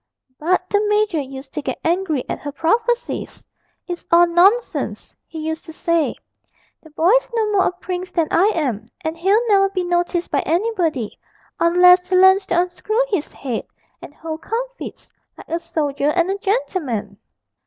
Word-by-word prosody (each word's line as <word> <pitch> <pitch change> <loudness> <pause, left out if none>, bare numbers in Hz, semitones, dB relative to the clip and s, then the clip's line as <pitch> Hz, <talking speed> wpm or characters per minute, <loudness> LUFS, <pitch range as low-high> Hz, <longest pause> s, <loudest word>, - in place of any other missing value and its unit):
But 365 +3 +1
the 410 +2 +1
major 420 -6 +1
used 270 0 -9
to 300 - -3
get - - -4
angry 330 -5 0
at - - -4
her 290 - -6
prophecies: 455 - -1 0.4
'It's 350 -1 -5
all 340 +1 +7
nonsense,' 380 +8 +1
he 325 - -10
used 320 0 -3
to 320 - -10
say, 335 -1 0 0.7
'the 315 - -16
boy's 360 +11 +2
no 435 -2 +1
more 395 -2 +3
a - - 0
prince 360 0 -5
than 330 -3 0
I 370 +4 +4
am, 240 -9 -2
and 320 -1 -3
he'll 400 +8 +2
never 390 -2 +4
be 375 -2 -2
noticed 350 0 -1
by 285 - +2
anybody, 335 - -1 0.4
unless 360 +1 +5
he 375 - +2
learns 380 +1 +5
to 350 - +2
unscrew 390 +6 0
his 390 -9 -2
head 250 -5 -5 0.3
and - - -10
hold 320 0 -6
comfits - - -6 0.2
like - - -13
a 335 - -1
soldier 295 -4 -1
and 345 +3 +1
a 395 - -2
gentleman!' 295 - -2
350 Hz, 165 wpm, -20 LUFS, 315-390 Hz, 0.7 s, all